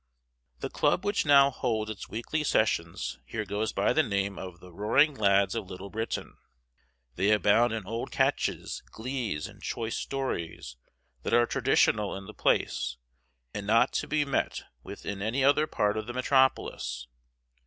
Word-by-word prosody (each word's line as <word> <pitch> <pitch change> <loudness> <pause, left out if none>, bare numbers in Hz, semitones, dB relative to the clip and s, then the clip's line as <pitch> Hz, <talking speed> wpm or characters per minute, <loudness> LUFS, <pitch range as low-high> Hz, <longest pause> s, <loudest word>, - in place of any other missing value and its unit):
The - - -3
club 185 - +1
which 205 -6 0
now 140 -1 +7
holds 110 -4 -1
its 105 - -8
weekly 135 +7 -2
sessions 85 - 0
here 110 -2 -4
goes 105 +1 -2
by - - +1
the - - +4
name 100 0 -1
of 90 -2 -8
"the 90 -1 -14
Roaring 130 - +3
Lads 100 -4 +3
of 110 -5 -4
Little 95 +1 -8
Britain." 110 +1 -4 0.8
They 95 +3 +2
abound 105 +3 +4
in 110 -3 -3
old 115 +4 -4
catches, - - 0
glees, 115 - -3
and - - -15
choice 115 -1 -3
stories 85 - -4 0.5
that 115 - +1
are 120 0 +5
traditional 120 -6 +2
in 95 - -9
the 110 - -10
place 60 -10 0 0.6
and 100 0 -5
not 115 +4 +4
to - - -1
be 150 -1 +1
met 140 - -1 0.2
with - - -10
in 100 -1 -4
any 115 +6 0
other 145 +3 +4
part 105 -6 0
of 110 - -4
the 120 - -5
metropolis. 130 - +1
110 Hz, 165 wpm, -28 LUFS, 100-130 Hz, 0.8 s, now